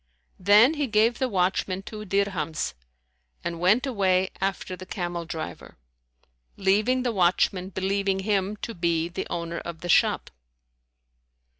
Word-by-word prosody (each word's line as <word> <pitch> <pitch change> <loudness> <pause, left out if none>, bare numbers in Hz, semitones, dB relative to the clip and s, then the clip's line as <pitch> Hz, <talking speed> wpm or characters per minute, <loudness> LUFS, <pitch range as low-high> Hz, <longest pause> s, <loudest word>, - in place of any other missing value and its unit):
Then 210 - +6
he 295 -3 -1
gave 225 +1 +2
the 260 - 0
watchman 190 -1 0
two 215 +1 -8
dirhams 180 - -1 0.7
and 170 -1 -4
went 205 +9 +3
away 190 -7 +1
after 190 -1 -2
the 185 0 -11
camel 175 -3 -4
driver, 160 - -7 0.8
leaving 215 +7 +2
the 245 - 0
watchman 185 0 +2
believing 195 0 0
him 200 0 0
to 230 - -3
be 170 -2 0
the 175 - -5
owner 170 0 -3
of 170 -1 -8
the 175 - -6
shop. - - +3
190 Hz, 135 wpm, -26 LUFS, 175-210 Hz, 0.8 s, Then